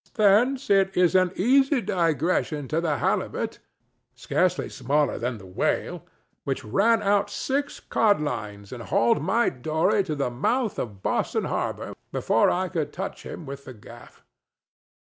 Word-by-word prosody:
Thence 230 +5 +3
it 195 -1 +3
is 180 -1 +4
an 185 -1 +3
easy 270 +6 +3
digression 165 - 0
to 160 +2 0
the 155 -4 0
halibut—scarcely - - -2
smaller 145 +2 0
than 120 0 -2
the 95 - -13
whale—which 90 +3 -4
ran 205 - +2
out 200 0 +2
six 280 +2 -2
codlines 110 - -1
and 125 - -7
hauled 115 +6 +2
my 205 +9 +2
dory 160 +9 +1
to 155 -4 -3
the 140 -3 -1
mouth 220 - 0
of 100 -5 -6
Boston - - 0
harbor - - -3 0.2
before - - +2
I 185 +1 0
could 165 -4 -3
touch - - -5
him 165 - -8
with 140 0 -8
the 130 - -9
gaff. 105 - -15
170 Hz, 140 wpm, -25 LUFS, 135-205 Hz, 0.2 s, is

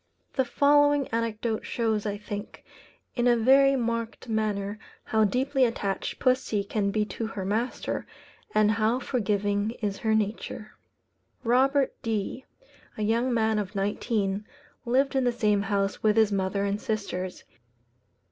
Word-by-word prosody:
The 265 - +1
following 290 +2 +4
anecdote 225 -1 -2
shows, 220 -3 -1
I 205 0 -2
think, 205 0 -7 0.5
in 240 -1 +1
a 240 -1 +5
very 275 +4 +5
marked 230 -1 -2
manner, 215 -2 -1 0.2
how 220 -1 +2
deeply 265 +5 +1
attached 205 -5 -1
pussy 255 -5 +1
can 200 0 -1
be 210 +1 0
to 225 +1 -4
her 195 -4 -5
master, 225 +6 -2 0.5
and 215 0 +5
how 220 +2 +2
forgiving 210 -3 -1
is 205 -2 -2
her 220 -1 +1
nature. 215 0 -3 0.7
Robert 265 +3 +3
D, 225 +3 -3 0.5
a 215 - -2
young 230 +4 +1
man 220 -2 +2
of 205 0 -5
nineteen, 200 0 -1 0.4
lived 270 +3 +2
in 265 - +3
the 245 - +2
same 210 -4 +1
house 200 0 -1
with 215 0 +3
his 220 -2 +4
mother 195 0 0
and 200 +1 -1
sisters. 185 -4 -3
220 Hz, 140 wpm, -27 LUFS, 205-245 Hz, 0.7 s, a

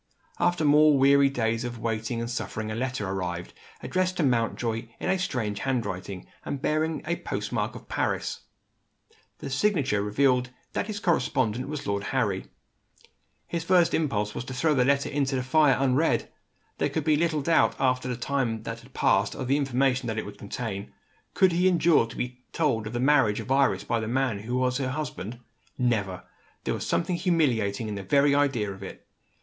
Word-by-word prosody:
After 175 -3 +2
more 150 0 +6
weary 140 +1 +5
days 115 -3 -1
of 120 -1 -5
waiting 115 +1 -2
and 115 - -3
suffering 110 -2 -4
a - - -3
letter 125 -4 -2
arrived, 90 -2 -4 0.3
addressed 185 0 0
to 170 - +1
Mountjoy 115 -2 0
in - - -2
a 190 - +1
strange 115 - -2
handwriting, 100 -7 -3 0.2
and 140 - -4
bearing 155 +3 0
the 170 +2 -1
post - - -4
mark - - -1
of - - -11
Paris. - - -1 1.0
The 140 -3 -7
signature 135 - +1
revealed 125 +4 +2 0.2
that - - -1
his 210 -2 -4
correspondent 130 - 0
was 150 -1 -5
Lord 100 0 -1
Harry. - - -1 1.0
His 170 -1 -3
first 175 -1 +4
impulse 105 -10 0
was - - -4
to 130 - -6
throw 155 +4 +2
the 125 -3 +3
letter 140 +1 +2
into 140 -2 0
the 130 - -1
fire, 135 0 +4
unread. 135 +4 +1 0.5
There - - +1
could - - -2
be 155 - +3
little 155 -2 0
doubt, 165 +3 +3
after 130 -1 +1
the 125 -2 -2
time 125 -4 -1
that 115 0 -5
had 125 +3 -18
passed, - - +2
of 130 -3 -4
the 135 +2 +3
information 135 -2 +1
that 110 -1 -2
it - - -2
would 100 0 -10
contain. 100 -1 -5 0.4
Could 190 -1 +5
he 175 +2 +3
endure 170 -8 +4
to 115 - -11
be 125 0 -5
told 125 -9 0
of 110 - -7
the 120 - -1
marriage 130 -6 +3
of - - -6
Iris, 135 0 +3
by 115 - 0
the 110 - -3
man 125 -3 0
who 115 +4 -4
was 125 0 +1
her 130 -2 -1
husband? 125 -6 -5 0.4
Never! 105 -7 0 0.4
There - - -1
was - - -4
something 170 +1 0
humiliating 125 - +1
in 105 - -3
the 100 - -4
very 140 +8 +3
idea 135 -8 +1
of 95 - -13
it. 95 - -9
130 Hz, 190 wpm, -27 LUFS, 115-145 Hz, 1.0 s, more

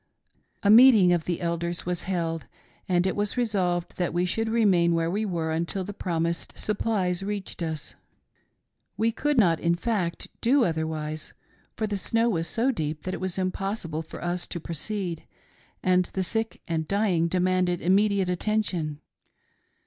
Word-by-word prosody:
A 200 - +5
meeting 220 -6 +8
of 170 -2 0
the 175 -2 -1
leaders 170 +1 -2
was 180 -1 -1
held, 165 -7 -2 0.4
and 180 0 +3
it 190 - 0
was 205 +3 -1
resolved 185 -7 0
that 175 -2 -1
we 175 +1 +2
should 225 +5 -1
remain 190 -7 +3
where 165 0 0
we 210 +3 -1
were 165 -4 -2
until 170 +4 -1
the 205 - -6
promised 170 -3 -2
supplies 200 -4 0
reached 200 -2 -5
us. 160 -3 -4 1.0
We 225 +1 +2
could 295 +5 0
not, 170 -8 +4
in 170 0 +2
fact, 180 -4 -2
do 255 +2 +4
otherwise, 160 -2 -3 0.4
for 220 - 0
the 205 -1 -2
snow 230 +4 +1
was 165 -6 -1
so 245 +4 +1
deep 155 - -3
that 185 - -3
it - - -5
was 185 -1 -2
impossible 185 -3 -2
for 160 - -9
us 175 0 -2
to 170 - -5
proceed, 170 +1 -4 0.6
and 185 0 +3
the 190 - 0
sick 225 +5 -2
and 160 -2 -1
dying 195 -5 +2
demanded 180 0 +1
immediate 195 +1 +3
attention. 180 -5 -1
180 Hz, 160 wpm, -26 LUFS, 170-205 Hz, 1.0 s, meeting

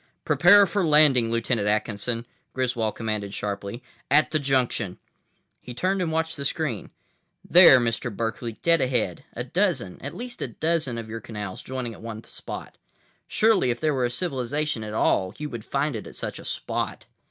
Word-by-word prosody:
"Prepare 175 +8 +7
for 195 +2 -1
landing, 150 -7 +5
Lieutenant 115 -2 0
Atkinson," 110 +2 -1 0.3
Griswold 120 -4 -1
commanded 105 -3 -3
sharply. 100 +3 -4 0.3
"At 150 +2 +4
the 155 - +1
junction." 125 -8 0 0.6
He 125 - -10
turned 185 +6 0
and 170 -3 -1
watched 160 0 -1
the 140 - -4
screen. 140 -6 -2 0.6
"There, 170 -7 +9
Mr. 120 0 -1
Berkeley, 115 +2 -3
dead 165 -2 +5
ahead. 120 -9 0
A 120 - -3
dozen—at 140 - -2
least 245 +1 -7
a - - -1
dozen 160 -7 -1
of 115 -1 -6
your 115 +1 -6
canals 105 -4 -6
joining 130 -3 -5
at - - -13
one 110 -1 -7
spot. - - -9 0.5
Surely, 215 - +3
if 120 0 -1
there 155 -1 +1
were 130 -2 +1
a - - 0
civilization 140 -2 -2
at 105 0 -6
all, 95 -2 +1
you 150 -1 -5
would 120 -3 -6
find 140 +2 -1
it 110 - -6
at - - -11
such - - -5
a - - -11
spot." - - -3
125 Hz, 175 wpm, -25 LUFS, 115-155 Hz, 0.6 s, There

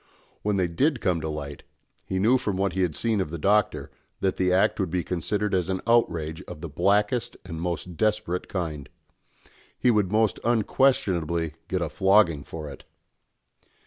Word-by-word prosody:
When 105 -1 0
they 90 -2 +2
did 130 - +1
come 90 -5 0
to 80 - -3
light, 70 -2 -6 0.5
he 95 - -2
knew 115 +7 +4
from 105 -6 -2
what 95 -1 0
he 95 - -1
had 85 -5 0
seen 110 -4 0
of 90 - -3
the 85 - -5
Doctor, 100 +5 +1 0.3
that 95 -1 0
the 90 -1 +2
act 95 +1 +3
would - - 0
be 90 +1 -1
considered 100 +4 -2
as 90 -1 +1
an 95 0 0
outrage 85 -9 +1
of - - -8
the 85 0 -6
blackest 105 - +1
and 80 -3 -6
most 90 0 -4
desperate 105 -4 0
kind. 75 -7 -4 0.9
He 125 - +3
would 105 -4 +1
most 110 0 +2
unquestionably 95 - +1
get 90 -2 -1
a - - -3
flogging 95 -7 +3
for 80 0 -7
it! 70 - -10
95 Hz, 175 wpm, -26 LUFS, 85-105 Hz, 0.9 s, knew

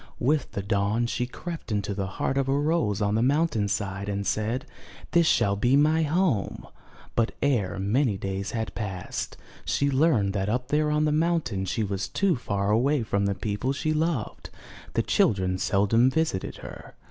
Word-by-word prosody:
With 145 +4 0
the 100 - -3
dawn, 100 +3 +1
she 120 +1 -2
crept 165 +1 -7
into 105 -1 -1
the 95 -1 -2
heart 135 - 0
of 135 -1 0
a 135 - +2
rose 145 - +1
on 100 0 +1
the 110 - +2
mountain 135 -5 +2
side 100 0 -3
and 100 0 -2
said 110 +6 -1 0.5
'This 170 -2 +4
shall 100 0 +3
be 120 +6 +2
my 155 +3 +4
home." 155 - 0 0.5
But 115 0 +1
ere 120 -10 +1
many 105 +3 +1
days 95 +1 -3
had 110 -1 -3
passed, 95 -5 -5 0.3
she 140 0 +1
learned 130 -9 +3
that 100 0 -1
up 125 +3 -1
there 150 +1 +2
on 150 0 +2
the 150 - +2
mountain 155 - 0
she 110 +4 -1
was 100 -1 -2
too 195 -3 +1
far 100 -4 -1
away 130 +4 +2
from 100 -2 0
the 100 - 0
people 110 +7 -2
she 155 +2 -1
loved; 155 -7 -2 0.5
the - - +2
children 95 -3 +1
seldom 105 +7 +3
visited 145 -9 -1
her. - - -10
115 Hz, 180 wpm, -26 LUFS, 100-145 Hz, 0.5 s, This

